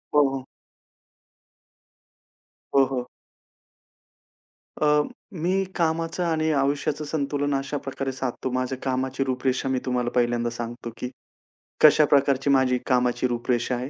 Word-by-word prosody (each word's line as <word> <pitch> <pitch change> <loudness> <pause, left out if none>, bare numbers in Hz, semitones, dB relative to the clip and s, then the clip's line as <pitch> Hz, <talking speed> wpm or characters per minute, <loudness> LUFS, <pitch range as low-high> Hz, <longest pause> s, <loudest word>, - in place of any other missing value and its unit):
हो, 145 -1 +6
हो. 135 -1 -5 2.3
हो, 135 - +7
हो. 125 -2 -3 1.7
अ, 150 0 +4 0.4
मी 185 +3 +1
कामाचं 165 +1 0
आणि 160 -2 +1
आयुष्याचं 145 +1 0
संतुलन 145 -1 -1
अशा 135 +2 -2
प्रकारे 135 -1 -4
साधतो. 130 0 -3
माझ्या 130 +1 -1
कामाची 130 0 -1
रूपरेषा 130 0 -1
मी 130 - +1
तुम्हाला 125 -1 0
पहिल्यांदा 120 -1 +1
सांगतो, 120 0 -6
की 125 - -4 0.7
कशाप्रकारची 140 -2 +5
माझी 130 -2 +4
कामाची 125 -1 +2
रूपरेषा 120 0 -1
आहे. 125 +2 -4
135 Hz, 110 wpm, -25 LUFS, 125-145 Hz, 2.3 s, हो